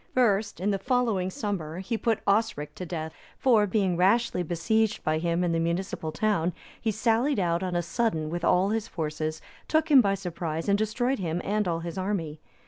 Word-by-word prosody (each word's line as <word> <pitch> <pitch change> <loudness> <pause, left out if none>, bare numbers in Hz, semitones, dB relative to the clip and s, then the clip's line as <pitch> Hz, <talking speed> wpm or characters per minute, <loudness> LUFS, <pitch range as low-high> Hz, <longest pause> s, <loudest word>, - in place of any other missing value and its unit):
First, 215 -5 +2
in 200 +3 +1
the 195 - -1
following 225 -5 +1
summer, 180 -5 -4
he 190 +5 -3
put 225 -1 0
Osric 200 -7 +1
to 180 - -7
death; 160 -2 -4 0.2
for, 225 -5 +4
being 190 -3 +1
rashly 195 +3 +2
besieged 205 +6 0
by 155 0 +1
him 170 +1 0
in 175 - +1
the 165 - +1
municipal 170 -1 -2
town,(286) 175 -1 0 0.3
he 225 - 0
sallied 230 +6 +1
out 170 -2 +1
on 185 -2 -2
a 175 - +1
sudden 165 -5 -1
with 175 0 -3
all 180 +3 +3
his 220 0 -1
forces, 155 -1 -3 0.2
took 315 0 +1
him 275 -3 +9
by 200 -3 +1
surprise, 165 -4 -4
and 200 0 +3
destroyed 245 +5 0
him 170 -2 -2
and 210 0 0
all 165 -1 -1
his 170 +3 -5
army. 175 -6 -2
190 Hz, 195 wpm, -27 LUFS, 170-220 Hz, 0.3 s, him